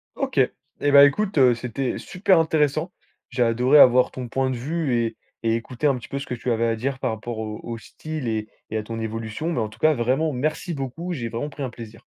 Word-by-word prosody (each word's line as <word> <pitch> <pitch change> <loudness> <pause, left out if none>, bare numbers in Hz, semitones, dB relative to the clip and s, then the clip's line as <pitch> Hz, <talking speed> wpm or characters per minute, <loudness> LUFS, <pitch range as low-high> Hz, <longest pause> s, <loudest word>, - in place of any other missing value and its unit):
OK. 270 - -1 0.4
Et 145 - +2
bah, 140 0 +9
écoute, 195 +6 0
heu, 125 -3 +6
c'était 125 +2 -3
super 185 -1 +2
intéressant. 155 +1 +1 0.4
J'ai 125 -1 +1
adoré 125 +5 +4
avoir 125 -1 +7
ton 125 -1 -6
point 130 +2 0
de 130 - -2
vue 145 +1 -1
et 115 -1 0 0.3
et 115 -1 +1
écouter 120 +5 -2
un 140 - +3
petit 125 - -9
peu 140 - -3
ce 140 - -6
que - - -5
tu 125 +1 -2
avais 115 0 +1
à 115 - +1
dire 135 +4 -3
par - - -1
rapport 110 +1 -5
au 110 -1 -5
au 115 -1 -5
style 155 +3 -6
et 110 -1 -2 0.2
et 110 - -1
à 110 - -2
ton 115 +1 -6
évolution, 115 +7 -3
mais 120 - 0
en 110 - -2
tout 110 +2 -16
cas, 155 0 +4
vraiment, 135 +5 0
merci 155 +7 -2
beaucoup, 150 +6 -4
j'ai 120 -7 -4
vraiment 120 +6 -4
pris 145 -1 -7
un 130 - -2
plaisir. 115 -2 -11
125 Hz, 240 wpm, -23 LUFS, 115-150 Hz, 0.4 s, bah